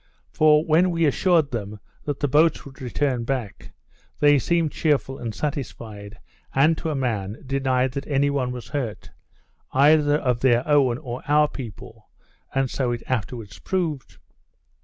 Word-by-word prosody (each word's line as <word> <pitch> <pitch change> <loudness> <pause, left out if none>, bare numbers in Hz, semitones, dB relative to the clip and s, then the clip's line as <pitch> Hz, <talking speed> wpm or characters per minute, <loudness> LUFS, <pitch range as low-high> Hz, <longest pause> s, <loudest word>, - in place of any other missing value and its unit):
For 155 - +4
when 170 +3 +4
we 165 -1 +1
assured 160 0 +2
them 105 -3 -5 0.3
that 145 -2 -3
the 145 - +2
boats 155 +3 +3
would 140 +1 -13
return 130 -1 -1
back, 120 -5 -4 0.5
they 145 -1 +5
seemed 165 +2 +1
cheerful 140 -3 0
and 115 -2 -5
satisfied, 105 -7 -5 0.4
and 155 +5 +4
to 160 - -3
a 155 - -1
man, 110 -6 -3
denied 130 -1 0
that 140 +2 -5
any 140 0 +2
one 130 -3 -1
was 120 -3 -8
hurt, 125 -7 -4 0.6
either 145 +2 +5
of 125 -5 0
their 125 0 +2
own 140 -5 +3
or 125 -4 -6
our 150 +1 +4
people, 120 -8 -10 0.5
and 135 0 +2
so 125 -1 -1
it 120 -1 -4
afterwards 110 -6 -4
proved. 160 - -3
135 Hz, 155 wpm, -23 LUFS, 120-150 Hz, 0.6 s, they